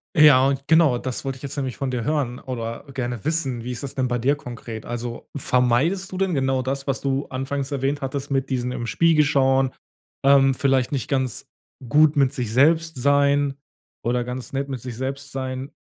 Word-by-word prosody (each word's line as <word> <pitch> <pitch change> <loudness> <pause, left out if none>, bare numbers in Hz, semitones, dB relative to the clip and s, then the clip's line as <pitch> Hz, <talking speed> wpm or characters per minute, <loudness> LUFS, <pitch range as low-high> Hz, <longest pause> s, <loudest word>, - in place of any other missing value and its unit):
Ja, 140 -3 +6
genau, 160 -6 +4
das 125 0 -4
wollt 135 -1 -3
ich 130 - -15
jetzt 140 - -5
nämlich 130 -4 -3
von 135 -2 -2
dir 125 -2 -2
hören 130 -3 -1
oder 115 -3 -5
gerne 120 -4 -3
wissen. 140 -7 -1
Wie 125 - -4
ist 125 - -6
das 140 - -5
denn 130 -1 0
bei 120 0 0
dir 130 +5 +2
konkret? 120 -5 -8
Also, 120 0 -6
vermeidest 135 +10 +1
du 185 - -5
denn 190 -1 0
genau 135 -2 +1
das, 135 +2 -3
was 135 -1 0
du 135 0 -1
anfangs 135 +1 -3
erwähnt 140 +1 -1
hattest 140 +1 -4
mit 135 -1 0
diesen 125 -2 -1
im 120 -2 -4
Spiegel 160 +5 +4
schauen, 135 -2 +2 0.5
ähm, 135 -1 +5
vielleicht 130 -2 +1
nicht 140 -3 -3
ganz 130 -5 -2 0.4
gut 150 +3 +4
mit 140 -2 +3
sich 120 -5 -3
selbst 160 +6 +3
sein 140 +1 +3 0.5
oder 120 +1 0
ganz 125 +1 -6
nett 140 +1 -2
mit 130 -4 -5
sich 125 -1 -6
selbst 135 +2 -4
sein. 130 0 -4
135 Hz, 195 wpm, -23 LUFS, 125-140 Hz, 0.5 s, Ja